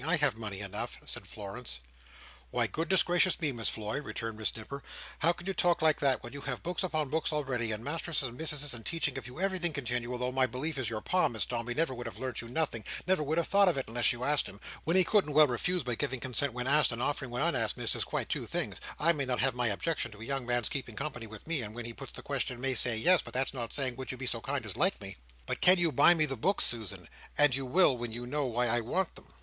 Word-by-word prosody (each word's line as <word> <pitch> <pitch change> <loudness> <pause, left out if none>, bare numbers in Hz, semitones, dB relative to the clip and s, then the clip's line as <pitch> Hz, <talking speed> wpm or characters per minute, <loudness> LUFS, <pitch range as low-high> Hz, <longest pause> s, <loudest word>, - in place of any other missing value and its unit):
I 160 +5 +3
have 145 -7 +2
money 105 -3 -5
enough," 100 0 -4
said - - -2
Florence. 105 - -4 0.7
"Why, - - +1
goodness 170 +3 +2
gracious 175 0 +2
me, 155 -4 0
Miss 115 -4 +1
Floy," 110 +5 -3
returned 115 -5 -5
Miss 110 - 0
Nipper, 140 +6 -7 0.4
"how 165 - +4
can 175 0 -7
you 195 - -1
talk 175 -2 +2
like 155 -1 +4
that, 135 -2 +1
when 120 - -8
you 140 - -7
have 135 -3 -3
books 180 +3 -2
upon 155 -6 0
books 160 +1 0
already, 130 -6 -1
and 110 +1 -3
masterses 155 -1 -1
and 120 - -10
mississes 150 -2 +2
a 120 - -6
teaching 145 +3 -1
of 125 - -9
you 125 +5 -10
everything 185 -3 +1
continual, 125 -3 -2
though 125 +1 -1
my 130 0 +2
belief 140 +4 -3
is 125 - -1
that - - -1
your 110 -2 -4
Pa, 180 -3 +2
Miss 115 -5 -1
Dombey, 120 0 -3
never 160 -3 +1
would 120 -1 -6
have 110 -3 -8
learnt 130 +1 -3
you 115 - -9
nothing, 120 -3 -1 0.2
never 185 -3 +2
would 150 +2 -1
have 170 - +1
thought 200 0 +5
of 170 - 0
it, 135 - -2
unless 115 -1 +4
you'd 120 0 -5
asked 145 -1 +2
him—when 100 - -5
he 185 - +7
couldn't 180 -5 +2
well 155 +1 +8
refuse; 155 +7 0
but 120 -2 -2
giving 135 -3 -1
consent 130 +3 +2
when 125 0 -3
asked, 150 +2 +4
and 115 - -4
offering 135 -2 -2
when 125 +4 -2
unasked, 125 - +1
Miss, - - +2
is - - 0
quite - - -2
two - - -3
things; - - -2 0.2
I 165 +3 +4
may 140 -4 -2
not 125 -1 -1
have 135 -1 +3
my 125 -1 0
objections 120 +3 -1
to 105 - -14
a - - -6
young 135 -1 -3
man's 120 -2 +3
keeping 130 -5 -3
company 135 -5 -4
with 110 -1 -10
me, 165 -4 +1
and 110 -1 -6
when 120 -1 -5
he 120 - -5
puts 135 +1 -10
the - - -8
question, 130 -3 -2
may 135 +1 0
say 120 -1 +3
'yes,' 180 +10 +5
but - - -11
that's 135 +1 +1
not 120 -3 -5
saying 130 -3 0
'would 130 - -4
you 130 - -6
be 130 - -5
so 120 -2 -2
kind 135 +3 -3
as - - -3
like 190 +5 +3
me.'" 100 -2 -5 0.3
"But - - -3
you 175 -1 +3
can 145 - -8
buy 175 - +7
me 155 -2 +2
the 135 -3 -4
books, 190 - +2
Susan; 110 -5 -3 0.3
and 145 -3 +5
you 135 -1 -2
will, 165 -1 +4
when 120 -1 -5
you 120 +2 -5
know 145 +3 -1
why 125 0 0
I 120 0 +2
want 170 +11 -1
them." - - -15
130 Hz, 275 wpm, -31 LUFS, 120-155 Hz, 0.7 s, well